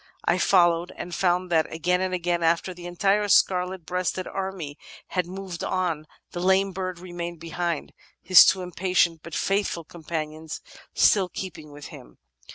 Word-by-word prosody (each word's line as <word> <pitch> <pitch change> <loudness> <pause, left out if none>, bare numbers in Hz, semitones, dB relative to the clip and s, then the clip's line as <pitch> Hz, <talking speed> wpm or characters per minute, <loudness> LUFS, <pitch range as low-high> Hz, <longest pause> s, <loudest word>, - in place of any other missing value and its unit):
I - - +3
f - - 0
oUowed 175 -2 +4
and 175 - -6
found 180 0 +1
that, 160 -2 +2
again 180 +3 0
and 185 0 -1
again, 175 -1 -1
after 170 +3 +1
the 175 0 -9
entire 195 +4 +1
scarlet 180 -3 +2
breasted 180 +1 -2
army 190 -7 -5 0.3
had 180 -2 -1
moved 185 -1 -6
on, 170 -5 -1 0.2
the 175 - -5
lame 190 +2 +3
bird 185 -1 -4
remained 175 -1 -6
behind, 170 0 -3 0.3
his 185 0 +8
two 190 -1 +2
impatient 180 -2 +1
but 170 -1 -8
faithful 195 -4 0
companions 160 -1 -6 0.4
still 190 -3 +4
keeping 160 -6 -7
with 145 0 -10
him. - - -13
175 Hz, 160 wpm, -25 LUFS, 165-185 Hz, 0.4 s, his